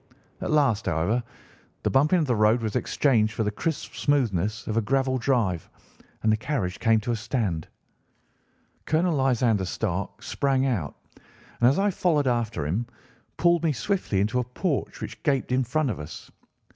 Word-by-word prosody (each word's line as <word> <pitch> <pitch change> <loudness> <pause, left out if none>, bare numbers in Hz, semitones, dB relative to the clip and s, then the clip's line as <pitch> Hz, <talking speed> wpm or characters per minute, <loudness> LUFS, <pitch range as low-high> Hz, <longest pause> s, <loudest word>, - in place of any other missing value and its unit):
At - - -3
last, 135 -10 +2
however, 95 +8 +1 0.6
the - - +1
bumping 150 +7 +4
of 165 - +2
the 125 -4 +1
road 110 +2 +3
was 110 -2 -2
exchanged 110 -7 +2
for 110 - -1
the 105 - 0
crisp 160 +8 -3
smoothness 115 - 0
of 110 - -3
a 115 - +3
gravel 130 +3 +1
drive, 115 - 0 0.5
and 110 - +4
the 110 - +3
carriage 110 -7 -2
came 115 -2 +3
to 120 +2 -2
a - - +1
stand. 105 - -2 1.2
Colonel 165 +3 +2
Lysander 125 -6 +2
Stark 90 - -3
sprang 135 -1 +1
out, 100 - -1 0.2
and, 120 - -2
as 135 - +1
I 200 +1 +2
followed 165 -5 +1
after 115 - 0
him, 100 +11 -1 0.5
pulled 170 -1 +3
me 160 -3 +2
swiftly 140 - -1
into 110 +5 +1
a - - +1
porch 140 - -3
which - - -7
gaped 135 -4 0
in 130 +1 +2
front 135 +2 0
of - - -5
us. 75 - -9
125 Hz, 170 wpm, -26 LUFS, 105-140 Hz, 1.2 s, bumping